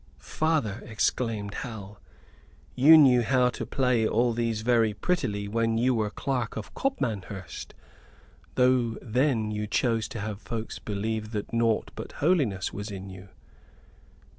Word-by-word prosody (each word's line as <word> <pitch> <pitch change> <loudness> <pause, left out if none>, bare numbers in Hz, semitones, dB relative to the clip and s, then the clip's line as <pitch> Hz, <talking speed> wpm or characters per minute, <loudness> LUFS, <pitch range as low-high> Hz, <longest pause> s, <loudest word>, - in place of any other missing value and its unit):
"Father," 155 -10 -1
exclaimed 110 -2 -1
Hal, 105 -4 -7 0.7
"you 155 +5 +8
knew 130 -5 +6
how 125 +1 +3
to - - -6
play 125 -4 +1
all 120 +2 +2
these 115 -2 -1
very 115 -2 +2
prettily 105 - -1
when 115 +1 0
you 125 +2 +3
were 110 -3 0
Clerk 125 -1 -3
of 105 - -7
Copmanhurst, 105 - -4 0.8
though 125 -2 +3
then 120 -2 0
you 105 0 -3
chose 115 0 +1
to 125 -4 -7
have 105 0 -5
folks 115 -1 -5
believe 110 +1 -3
that 105 +1 -4
naught 115 -1 +1
but - - -8
holiness 140 - +1
was 100 +2 -5
in 95 -1 -7
you." 95 +1 -11
115 Hz, 140 wpm, -27 LUFS, 105-125 Hz, 0.8 s, you